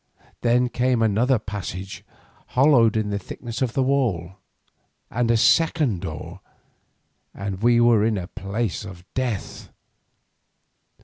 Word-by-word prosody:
Then 125 +1 +3
came 125 -1 +1
another 115 +5 +2
passage 100 -2 -6 0.5
hollowed 125 -6 +5
in 105 -1 -1
the 100 - -1
thickness 115 +6 -7
of 125 -3 0
the 135 - +1
wall, 110 -10 0 0.7
and 120 0 0
a 115 - +4
second 150 - +3
door, 80 -5 -7 1.0
and 100 -1 -5
we 120 0 +4
were 120 -3 +4
in 110 0 +1
the 90 -3 -4
place 100 +3 -3
of 90 -3 -10
death. 120 -7 -4
115 Hz, 125 wpm, -23 LUFS, 100-125 Hz, 1.0 s, hollowed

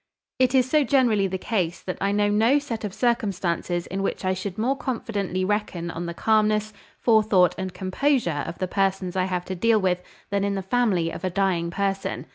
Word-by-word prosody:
"It 255 0 +3
is 255 -1 +4
so 300 +2 +3
generally 240 -8 +3
the 190 0 -3
case 180 -5 -2
that 185 - -5
I 200 - +1
know 205 0 +2
no 220 +7 +3
set 245 -7 -4
of 205 - -3
circumstances 190 -7 -1
in 195 +1 -4
which 195 - -2
I 185 - +2
should 185 0 -5
more 250 +5 +1
confidently 205 -8 -2
reckon 185 -4 -2
on 170 +1 -5
the 170 - -5
calmness, 215 0 +2 0.2
forethought, 215 -6 +4
and 190 0 -4
composure 185 - 0
of 165 - -6
the 185 - -2
persons 190 -1 -1
I 185 -1 +1
have 180 -1 -2
to 190 - -4
deal 220 +4 +3
with 180 -2 0 0.3
than 200 0 +1
in 200 0 0
the 195 - -3
family 190 -6 +1
of - - -8
a 185 - 0
dying 180 -2 0
person. 195 +2 -2
195 Hz, 205 wpm, -24 LUFS, 185-220 Hz, 0.3 s, is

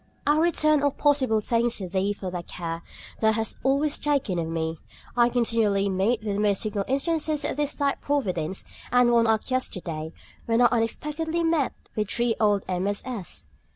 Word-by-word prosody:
I 295 +1 +3
return 305 -3 +3
all 285 - +3
possible 270 -6 +2
thanks 235 +2 +1
to 190 - -5
Thee 190 +2 0
for 195 -2 -5
the 180 -1 -3
care 165 -1 -5 0.4
Thou 220 0 +3
hast 225 0 -1
always 280 +3 +1
taken 275 -12 0
of 165 - -2
me. 160 0 -3 0.4
I 240 -1 +4
continually 225 -5 +1
meet 210 +5 +1
with 205 -2 -2
most 205 -2 +2
signal 205 -2 -2
instances 305 +2 0
of - - -2
this 295 0 -1
Thy 280 -1 +1
providence, 190 - -2 0.3
and 245 0 +5
one 235 -1 +4
act 220 +3 +1
yesterday, 170 -11 -2 0.4
when 230 0 +2
I 245 - +6
unexpectedly 300 +8 -1
met 325 -4 +1 0.2
with 210 -2 -1
three 235 -1 +1
old 205 -2 +3
MSS. 190 - -3
230 Hz, 170 wpm, -26 LUFS, 195-280 Hz, 0.4 s, I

